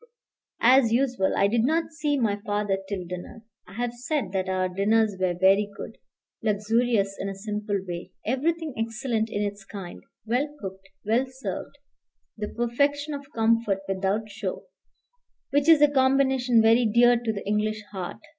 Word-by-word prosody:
As 250 -1 +6
usual, 245 -5 +1
I - - +4
did 225 +2 +1
not 320 +5 +1
see 300 -2 -1
my 220 -6 +1
father 205 -2 0
till 190 -3 -3
dinner. 180 +5 -8 0.2
I 180 - -13
have 240 +2 -2
said 245 - -2
that 190 -1 -1
our 185 0 +1
dinners 205 +3 +2
were 180 -1 +1
very 195 +3 +4
good, 225 - -8 0.4
luxurious 215 -1 +1
in 195 - -3
a 195 - -5
simple 205 0 -3
way, 175 0 -5 0.2
everything 310 +5 -1
excellent 225 0 -2
in 205 -1 -2
its 205 0 -4
kind, 195 -4 -9 0.2
well 250 +6 +1
cooked, 190 0 -8 0.2
well 235 +5 +2
served, 265 +1 -6 0.6
the 210 -1 -4
perfection 285 +5 0
of 280 0 -8
comfort 225 -3 +2
without 195 +3 -1
show, 205 -2 -5 0.9
which 285 +2 +2
is 315 -2 +7
a - - +8
combination 265 -3 +3
very 225 +1 +5
dear 240 +3 +5
to 235 -2 -1
the 200 -2 -6
English 215 +1 -1
heart. 185 -3 -6
220 Hz, 160 wpm, -26 LUFS, 200-255 Hz, 0.9 s, a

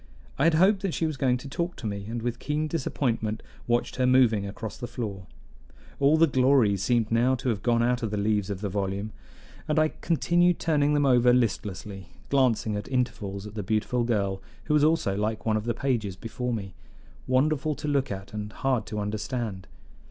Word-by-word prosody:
I 140 - +3
had 165 -1 +4
hoped 190 +4 +4
that 195 -4 -2
she 165 - 0
was 155 -2 -2
going 130 -2 +1
to 125 - -9
talk 170 +5 -3
to - - -9
me, 100 -1 -3
and 115 0 -4
with 120 -1 -2
keen 150 +1 -1
disappointment 120 -8 -2 0.2
watched 120 0 0
her 130 -1 +2
moving 120 -6 +4
across 105 +1 -6
the 120 - -6
floor. 100 -7 -5 0.7
All 140 +3 +4
the 165 - +6
glory 130 -6 +3
seemed 115 +3 0
now 120 +3 +3
to 130 0 -3
have 105 -4 -1
gone 115 +1 +2
out 125 +1 +1
of 115 - -1
the 105 - -3
leaves 105 -1 0
of 100 -1 -4
the 105 - -1
volume, 100 +2 -2 0.6
and 150 - 0
I 155 0 +4
continued 175 +2 +2
turning 150 -2 +2
them 145 -1 +2
over 125 -2 +5
listlessly, 100 -5 -1 0.2
glancing 125 -6 +2
at 105 - -4
intervals 110 -6 -2
at 105 - -9
the 105 - -3
beautiful 110 +4 0
girl, 100 -5 -1 0.2
who - - -1
was 150 -1 +4
also 155 -11 +2
like 105 +2 -2
one 110 -1 +2
of 110 0 -2
the 120 -2 -1
pages 115 -7 -1
before 125 +5 -4
me, 100 -5 -4 0.5
wonderful 150 +3 +1
to 150 - -6
look 140 -4 0
at 95 +1 -7
and 105 0 -5
hard 130 -5 -1
to 105 - -5
understand. 105 -2 -3
120 Hz, 205 wpm, -27 LUFS, 105-140 Hz, 0.7 s, the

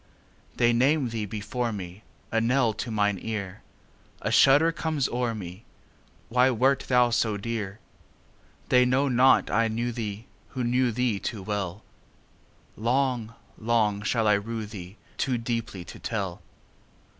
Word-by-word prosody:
They 120 -1 +3
name 135 +2 +2
thee 110 -2 -3
before 110 +4 -3
me,A 100 +3 -5
knell 120 -1 +2
to 110 - -5
mine 105 -3 +1
ear;A 100 -3 -7
shudder 145 +5 +6
comes 155 -4 -1
o'er 120 -1 -1
me—Why 110 +6 -3
wert 130 +2 +2
thou 125 -1 +4
so 110 -2 +1
dear? 105 -2 -4 0.9
They 125 0 +6
know 130 +3 +2
not 130 +1 +4
I 115 +2 +3
knew 120 +2 -2
theeWho 110 -1 -5 0.4
knew 125 +1 +2
thee 115 -3 0
too 105 -2 -5
well:Long, 110 +5 -4 0.2
long 110 -3 +1
shall 110 +1 +1
I 105 - +5
rue 110 +2 -2
theeToo 105 +5 -5
deeply 115 -6 -3
to - - -11
tell. 100 -6 -3
115 Hz, 120 wpm, -26 LUFS, 105-125 Hz, 0.9 s, shudder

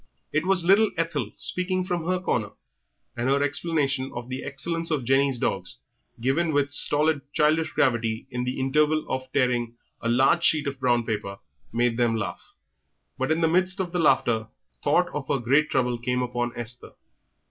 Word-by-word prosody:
It 155 +4 0
was 190 -2 +3
little 200 +5 +5
Ethel 150 -9 -2
speaking 185 0 -1
from 175 -3 -3
her 185 0 +1
corner, 115 - -2 0.6
and 120 +2 -1
her 140 +1 +2
explanation 140 -3 0
of 120 +1 -6
the 130 +1 -5
excellence 165 +5 -3
of 150 -5 -1
Jenny's 135 +1 +2
dogs, 95 -5 -2 0.4
given 150 +7 +1
with 145 0 +1
stolid 145 +1 +3
childish 155 +2 +2
gravity 115 -3 0
in 125 -1 -2
the 125 +1 -3
interval 150 +4 +2
of 130 0 -4
tearing 125 -3 0 0.3
a 115 - -1
large 135 +8 +3
sheet 155 -2 +3
of 140 -1 -4
brown 120 -3 +2
paper, 105 -3 -3 0.3
made 120 0 +1
them 120 -2 +2
laugh. 110 - -4 0.8
But 130 +4 0
in 160 +1 +1
the 165 - +4
midst 185 +3 +1
of 180 -2 -2
the 180 - -1
laughter 120 -7 +2 0.4
thought - - +3
of - - -5
her 140 - +1
great 135 +5 +2
trouble 125 -4 0
came 125 +1 -1
upon 120 -1 -2
Esther. 120 +1 -5
135 Hz, 175 wpm, -25 LUFS, 120-160 Hz, 0.8 s, little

